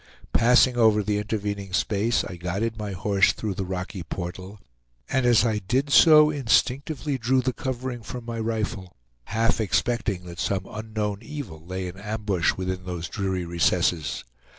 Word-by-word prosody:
Passing 125 Hz, +1 st, +5 dB
over 110 Hz, -3 st, +4 dB
the 105 Hz, +1 st, 0 dB
intervening 100 Hz, -2 st, -3 dB
space 105 Hz, +5 st, +1 dB
I 90 Hz, -, -7 dB
guided 95 Hz, +6 st, -2 dB
my 105 Hz, -2 st, -5 dB
horse 100 Hz, +1 st, +2 dB
through 105 Hz, -3 st, -3 dB
the 95 Hz, 0 st, -4 dB
rocky 95 Hz, +1 st, -4 dB
portal, 90 Hz, +4 st, -6 dB, 0.5 s
and 130 Hz, -2 st, +1 dB
as 120 Hz, -1 st, +5 dB
I 110 Hz, -2 st, +1 dB
did 130 Hz, +9 st, -1 dB
so 150 Hz, -1 st, +7 dB
instinctively 140 Hz, +2 st, 0 dB
drew 130 Hz, +3 st, +2 dB
the 130 Hz, 0 st, 0 dB
covering 130 Hz, -1 st, -4 dB
from 120 Hz, +2 st, -7 dB
my 115 Hz, -1 st, -4 dB
rifle, 110 Hz, -4 st, -3 dB, 0.3 s
half 115 Hz, +2 st, +1 dB
expecting 110 Hz, -2 st, 0 dB
that 85 Hz, -1 st, -10 dB
some 95 Hz, 0 st, -1 dB
unknown 110 Hz, -2 st, -4 dB
evil 115 Hz, -, -8 dB
lay 95 Hz, +2 st, -4 dB
in 90 Hz, +2 st, -8 dB
ambush 105 Hz, -4 st, 0 dB
within 95 Hz, 0 st, -3 dB
those 85 Hz, -3 st, -4 dB
dreary 95 Hz, -3 st, -2 dB
recesses. 85 Hz, -3 st, +1 dB
105 Hz, 155 wpm, -25 LUFS, 95-120 Hz, 0.5 s, so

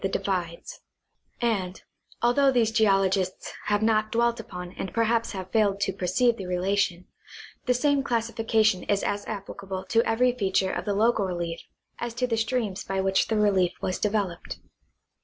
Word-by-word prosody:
33 195 Hz, -, -1 dB
the -, -, +1 dB
divides; 175 Hz, -4 st, -3 dB, 0.6 s
and, 195 Hz, -6 st, -1 dB, 0.4 s
although 270 Hz, +4 st, +4 dB
these 235 Hz, -3 st, +2 dB
geologists 195 Hz, -4 st, +1 dB
have 205 Hz, 0 st, +1 dB
not 215 Hz, -1 st, +2 dB
dwelt 235 Hz, 0 st, +1 dB
upon 180 Hz, -4 st, -7 dB
and 190 Hz, -1 st, -6 dB
perhaps 230 Hz, 0 st, +1 dB
have 185 Hz, -1 st, -6 dB
failed 205 Hz, -3 st, +2 dB
to 195 Hz, -1 st, 0 dB
perceive 235 Hz, +6 st, +1 dB
the 190 Hz, -, -6 dB
relation, 180 Hz, 0 st, 0 dB, 0.6 s
the 250 Hz, -, +4 dB
same 285 Hz, +2 st, +2 dB
classi 230 Hz, -3 st, -1 dB
fication 220 Hz, -4 st, +2 dB
is 200 Hz, -1 st, +2 dB
as 205 Hz, 0 st, -2 dB
applicable 195 Hz, -2 st, -6 dB
to 230 Hz, -1 st, +3 dB
every 240 Hz, +2 st, +2 dB
feature 190 Hz, -5 st, 0 dB
of -, -, -4 dB
the 205 Hz, -2 st, 0 dB
local 220 Hz, 0 st, +2 dB
relief 170 Hz, -2 st, -3 dB, 0.4 s
as 235 Hz, -1 st, -4 dB
to 250 Hz, +1 st, 0 dB
the 240 Hz, -2 st, 0 dB
streams 220 Hz, -3 st, -1 dB
by 195 Hz, 0 st, -2 dB
which 190 Hz, 0 st, +2 dB
the 220 Hz, -, 0 dB
relief 195 Hz, -4 st, +3 dB
was 185 Hz, -, -2 dB
developed. 205 Hz, -5 st, -2 dB
205 Hz, 170 wpm, -26 LUFS, 190-230 Hz, 0.6 s, although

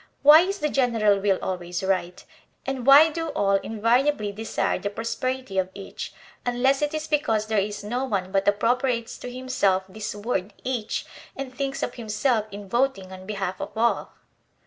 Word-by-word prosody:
Why 300 Hz, +2 st, +10 dB
is 390 Hz, +3 st, -1 dB
the 300 Hz, -, 0 dB
general 225 Hz, -7 st, +2 dB
will 195 Hz, -1 st, +2 dB
always 180 Hz, -1 st, -3 dB
right, 185 Hz, -2 st, -1 dB, 0.4 s
and 270 Hz, -2 st, -3 dB
why 295 Hz, +4 st, +8 dB
do 330 Hz, +1 st, -3 dB
all 195 Hz, 0 st, +2 dB
invariably 230 Hz, +2 st, +1 dB
desire 200 Hz, -1 st, -1 dB
the 205 Hz, -, -2 dB
prosperity 230 Hz, 0 st, -3 dB
of 185 Hz, 0 st, 0 dB
each, 200 Hz, -1 st, -7 dB, 0.3 s
unless 260 Hz, +3 st, +2 dB
it 295 Hz, +1 st, 0 dB
is 310 Hz, 0 st, -3 dB
because 225 Hz, -9 st, +1 dB
there 220 Hz, -1 st, +1 dB
is 205 Hz, +1 st, -3 dB
no 245 Hz, +5 st, -2 dB
one 190 Hz, -6 st, -2 dB
but 195 Hz, +1 st, +1 dB
appropriates 235 Hz, +3 st, +1 dB
to 250 Hz, -, -7 dB
himself 245 Hz, -7 st, +1 dB
this 210 Hz, +2 st, -6 dB
word 205 Hz, -2 st, -2 dB
each 245 Hz, -4 st, -2 dB, 0.3 s
and 270 Hz, -2 st, -6 dB
thinks 275 Hz, +1 st, -3 dB
of -, -, -2 dB
himself 220 Hz, 0 st, 0 dB
in 200 Hz, 0 st, -9 dB
voting 235 Hz, -5 st, 0 dB
on 185 Hz, 0 st, -10 dB
behalf 195 Hz, -3 st, -3 dB
of -, -, -6 dB
all? 235 Hz, +1 st, +1 dB
225 Hz, 170 wpm, -25 LUFS, 200-260 Hz, 0.4 s, Why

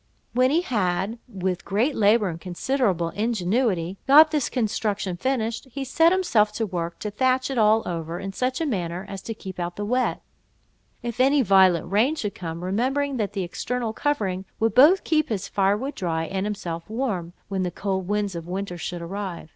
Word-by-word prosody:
When 255 Hz, +1 st, +4 dB
he 320 Hz, +5 st, +3 dB
had, 210 Hz, -, -1 dB
with 185 Hz, -5 st, -3 dB
great 230 Hz, +9 st, 0 dB
labour 210 Hz, -1 st, +4 dB
and 165 Hz, 0 st, -7 dB
considerable 185 Hz, -2 st, 0 dB
ingenuity, 200 Hz, -3 st, 0 dB
got 305 Hz, +3 st, +8 dB
this 300 Hz, -4 st, 0 dB
construction 210 Hz, -5 st, -1 dB
finished, 235 Hz, +2 st, -2 dB
he 275 Hz, +2 st, -4 dB
set 325 Hz, +6 st, +4 dB
himself 245 Hz, -, +3 dB
to 225 Hz, -, -1 dB
work 170 Hz, -3 st, -4 dB
to 210 Hz, -, -3 dB
thatch 255 Hz, +4 st, +1 dB
it 260 Hz, -, 0 dB
all 215 Hz, +1 st, +4 dB
over, 165 Hz, 0 st, -4 dB
in 195 Hz, +1 st, -5 dB
such 255 Hz, +4 st, -1 dB
a 325 Hz, -, 0 dB
manner 180 Hz, -, -2 dB
as 195 Hz, -1 st, -7 dB
to 225 Hz, -, -6 dB
keep 190 Hz, -4 st, -8 dB
out 175 Hz, 0 st, -3 dB
the 205 Hz, -, -4 dB
wet, 250 Hz, +4 st, 0 dB, 0.8 s
if 235 Hz, -1 st, -5 dB
any 270 Hz, +2 st, +4 dB
violent 185 Hz, -4 st, +4 dB
rain 235 Hz, +10 st, +3 dB
should 210 Hz, -9 st, -3 dB
come, 165 Hz, -1 st, -6 dB
remembering 260 Hz, +8 st, 0 dB
that 210 Hz, -3 st, -2 dB
the 195 Hz, -2 st, -2 dB
external 230 Hz, +6 st, -3 dB
covering 200 Hz, -10 st, -1 dB
would 225 Hz, 0 st, +1 dB
both 305 Hz, +9 st, +6 dB
keep 310 Hz, -2 st, +1 dB
his 200 Hz, -3 st, -2 dB
firewood 205 Hz, +8 st, 0 dB
dry 165 Hz, -4 st, -2 dB
and 190 Hz, +4 st, -2 dB
himself 175 Hz, -4 st, -5 dB
warm, 215 Hz, -8 st, -2 dB
when 195 Hz, -1 st, -2 dB
the 180 Hz, -, 0 dB
cold 190 Hz, 0 st, -3 dB
winds 205 Hz, -1 st, -1 dB
of 170 Hz, -1 st, -6 dB
winter 185 Hz, -1 st, -4 dB
should 175 Hz, +1 st, -5 dB
arrive. 185 Hz, -2 st, -5 dB
205 Hz, 185 wpm, -24 LUFS, 185-250 Hz, 0.8 s, got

